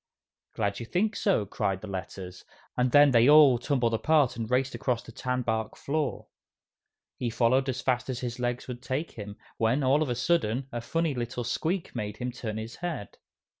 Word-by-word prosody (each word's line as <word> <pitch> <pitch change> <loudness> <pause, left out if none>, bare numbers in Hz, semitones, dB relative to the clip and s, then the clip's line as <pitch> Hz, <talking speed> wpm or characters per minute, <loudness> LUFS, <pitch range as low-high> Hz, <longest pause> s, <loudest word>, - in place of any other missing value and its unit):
"Glad 100 0 -1
you 115 - -6
think 210 - 0
so!" 190 - +1
cried 95 -1 -2
the 110 - -7
Letters, 95 -1 -7 0.3
and 125 0 +1
then 145 +1 +7
they 120 +2 +5
all 145 -5 +7
tumbled 125 -3 0
apart 145 +3 +3
and 115 -1 -4
raced 130 +2 +1
across 120 -3 -1
the - - -11
tanbark 115 -3 -2
floor. 150 -1 -2 0.9
He 120 - -2
followed 125 +4 +2
as 130 -1 -2
fast 125 -1 0
as 125 -2 -3
his 125 0 -4
legs 120 0 -2
would 125 -1 -6
take 135 +5 -3
him, 105 -1 -8 0.2
when, 115 +6 +2
all 135 +4 +3
of 155 - 0
a 120 - 0
sudden, 130 -4 0
a 120 - -4
funny 165 +5 -1
little 120 -1 -3
squeak 170 +9 -2
made 105 0 -4
him 125 0 -3
turn 110 -3 -5
his 110 +2 -6
head. 170 - -5
125 Hz, 190 wpm, -28 LUFS, 115-140 Hz, 0.9 s, then